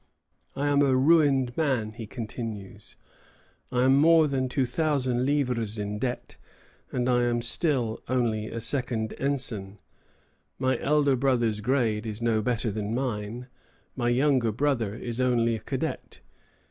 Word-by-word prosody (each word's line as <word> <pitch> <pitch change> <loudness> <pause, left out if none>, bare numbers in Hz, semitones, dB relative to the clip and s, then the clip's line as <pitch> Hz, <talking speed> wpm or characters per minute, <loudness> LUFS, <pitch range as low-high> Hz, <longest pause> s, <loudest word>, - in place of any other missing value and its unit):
"I 140 +1 -1
am 145 0 +3
a 135 -2 +3
ruined 135 -3 +3
man," 130 -9 0
he 110 0 -8
continues. 110 -2 -7 0.8
"I 125 0 +1
am 130 +1 +5
more 160 0 +6
than 130 -2 -1
two 130 0 0
thousand 130 -2 0
livres 125 -7 0
in 105 0 -4
debt, 125 +1 -4 0.5
and 125 -1 -1
am 120 -1 +1
still 120 -3 +1
only 115 -4 0
a 115 - -5
second 115 -2 -1
ensign. 120 -8 -1 0.8
My 130 0 0
elder 145 -2 +2
brother's 120 -5 +1
grade 115 -2 0
is 105 0 -4
no 115 -2 +1
better 115 0 -1
than 105 +2 -3
mine. 120 -2 -3 0.5
My 120 -2 0
younger 130 -2 +2
brother 120 -4 0
is 120 +1 -3
only 120 -2 +2
a - - -5
cadet. - - -5
125 Hz, 140 wpm, -27 LUFS, 110-135 Hz, 0.8 s, more